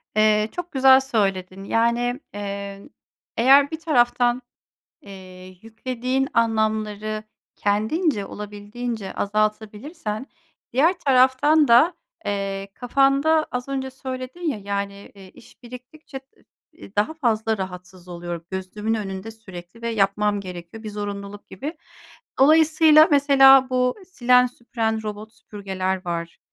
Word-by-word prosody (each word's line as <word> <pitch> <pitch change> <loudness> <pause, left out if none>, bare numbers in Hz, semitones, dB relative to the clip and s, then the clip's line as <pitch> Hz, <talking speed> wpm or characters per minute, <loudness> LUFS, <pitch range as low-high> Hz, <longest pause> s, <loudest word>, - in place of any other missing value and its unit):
Eee, 215 0 +3
çok 355 0 -6
güzel 265 -1 +6
söyledin 195 -7 -2
yani, 235 +4 0
eee, 200 +2 -6 0.5
eğer 275 +4 +5
bir 320 - -5
taraftan, 245 -5 +2 0.6
eee, 185 -2 -12
yüklediğin 255 +4 -3
anlamları 215 -1 -1 0.3
kendince, 215 - 0
olabildiğince 210 +1 -6
azaltabilirsen 215 - -3 0.5
diğer 330 +8 +3
taraftan 275 +3 +4
da, 245 +10 +5 0.3
eee, 195 -1 -3
kafanda 275 +5 +2
az 250 +1 -4
önce 265 -1 -3
söyledin 260 +3 -7
ya, 310 -10 -2
yani, 200 0 -5
eee, 190 -2 -14
iş 235 - -19
biriktikçe 255 +4 -11 0.2
i - - -28 0.4
i 195 - -21
daha 210 +10 +1
fazla 225 -7 0
rahatsız 180 -1 -8
oluyor, 175 -1 -6
gözümün 195 +4 -3
önünde 200 0 -5
sürekli 200 -2 -12
ve 235 - -2
yapmam 205 -1 +1
gerekiyor 180 +3 -9
bir 215 - -6
zorunluluk 205 0 -6
gibi. 300 +5 -7 0.6
Dolayısıyla 310 +2 +6
mesela 270 -2 +6
bu 250 0 +1
silen, 250 -7 +4
süpüren 230 -2 -3
robot 215 +1 -7
süpürgeler 190 -3 -4
var, 170 -1 -4
220 Hz, 115 wpm, -22 LUFS, 200-260 Hz, 0.6 s, güzel